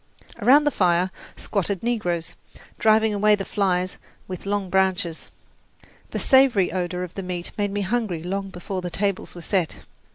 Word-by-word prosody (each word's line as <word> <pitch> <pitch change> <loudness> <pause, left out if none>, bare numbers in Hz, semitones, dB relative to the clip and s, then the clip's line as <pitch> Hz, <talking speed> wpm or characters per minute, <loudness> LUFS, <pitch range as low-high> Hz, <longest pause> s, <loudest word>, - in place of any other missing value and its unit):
Around 285 +4 +6
the 295 - +2
fire 180 -2 +2 0.3
squatted 200 -1 -2
negroes, 180 -9 -1 0.5
driving 220 0 +4
away 210 +1 +4
the 195 -1 -5
flies 185 -2 0 0.3
with 185 +1 -7
long 200 -1 -1
branches. 185 -3 0 0.8
The - - -4
savoury 260 -9 +4
odour 180 -1 -2
of 180 - -7
the 195 - -5
meat 180 -2 -5
made 205 -1 0
me 205 0 -1
hungry 200 -5 -1
long 195 +2 -3
before 185 +1 -5
the 180 - -4
tables 200 0 -2
were 175 - -8
set. 175 -2 -1
190 Hz, 160 wpm, -24 LUFS, 180-210 Hz, 0.8 s, Around